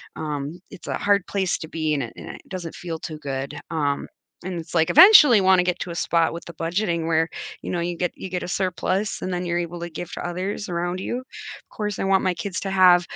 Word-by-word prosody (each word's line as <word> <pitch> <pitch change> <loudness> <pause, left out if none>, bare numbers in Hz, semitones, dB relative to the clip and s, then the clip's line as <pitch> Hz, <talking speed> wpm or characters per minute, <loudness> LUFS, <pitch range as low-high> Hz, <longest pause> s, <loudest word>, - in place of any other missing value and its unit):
Um, 150 +2 -4
it's - - -12
a - - -2
hard 200 -2 +2
place 190 -3 0
to 160 - -8
be, 155 -1 -1
and 140 - -1
it 115 - -7
and - - -10
it - - -9
doesn't 180 -4 -6
feel 165 -2 -5
too 155 -1 -6
good, 140 0 -5
um, 145 -3 -1 0.4
and 180 -2 -3
it's 160 +1 -9
like, 160 -1 +3
eventually 300 - +9
wanna 185 -1 +5
get 180 0 -1
to 175 - -4
a - - -6
spot 165 0 +1
with 170 - -7
the 170 - -9
budgeting 170 +1 -1
where, 165 0 +2 0.3
you - - -5
know, 175 - -1
you 175 +1 -2
get 180 -1 -1
you 190 - -7
get 180 0 -3
a - - -5
surplus, 190 +2 -1
and 185 - -2
then 180 0 -2
you're 170 - 0
able 175 0 -4
to 170 0 -5
give 170 +1 -7
to - - -5
others 185 +3 -4
around 175 +1 -2
you, 245 +6 -3 0.5
course, 210 -1 -3
I - - 0
want 195 0 +3
my 185 - +2
kids 190 +2 -4
to 195 - -3
have, 180 -2 +6
175 Hz, 245 wpm, -23 LUFS, 165-190 Hz, 0.5 s, eventually